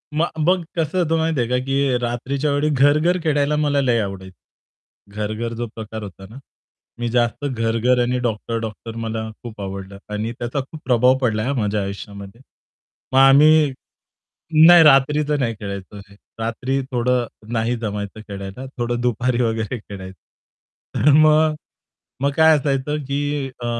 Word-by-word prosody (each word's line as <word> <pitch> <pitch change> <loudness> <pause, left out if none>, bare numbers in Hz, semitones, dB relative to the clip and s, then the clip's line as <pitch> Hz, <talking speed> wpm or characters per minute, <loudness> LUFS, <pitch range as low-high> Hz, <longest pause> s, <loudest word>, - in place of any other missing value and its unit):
मग 165 +2 +1
बघ 180 -1 +2
कसं 165 +2 -1
होतं 165 -1 +1
माहिती 160 -3 0
आहे 120 0 0
का, 125 - +1
की 135 -2 +1
रात्रीच्या 130 +5 -2
वेळी 145 +2 +1
घर-घर 150 +5 +3
खेळायला 150 -1 +1
मला 145 -2 +1
लय 120 -3 +2
आवडायचं. 95 -2 -6 0.8
घर-घर 110 +2 -3
जो 120 +1 -4
प्रकार 110 -1 -7
होता 95 -1 -10
ना? 115 - -12 0.6
मी 120 -1 -2
जास्त 120 +4 0
घर-घर 115 0 +1
आणि 125 +1 0
डॉक्टर-डॉक्टर 115 -1 -4
मला 110 0 -4
खूप 110 -3 -8
आवडलं 95 0 -7 0.2
आणि 110 +2 -2
त्याचा 120 +4 -3
खूप 140 +4 -8
प्रभाव 125 +1 +4
पडलाय 110 -3 0
हा 140 - 0
माझ्या 105 0 0
आयुष्यामध्ये. 100 +3 -8 0.7
मग 130 - +1
आम्ही 145 +2 +6 1.0
नाही 175 -1 +9
रात्रीचं 150 +1 +4
नाही 115 -4 -1
खेळायचो 100 0 -7
हे. 100 0 -14 0.2
रात्री 125 +4 -2
थोडं 125 0 +1 0.3
नाही 115 +1 0
जमायचं 105 -2 -5
खेळायला 100 +5 -7
थोडं 120 0 -2
दुपारी 125 +1 0
वगैरे 115 +1 -1
खेळाय 95 -3 -9 0.8
तर 150 - +4
मग 155 +1 +5 0.7
मग 140 +1 +2
काय 160 -1 +6
असायचं, 140 0 -1
की 145 0 -2
अ, - - -4
125 Hz, 150 wpm, -21 LUFS, 110-145 Hz, 1.0 s, नाही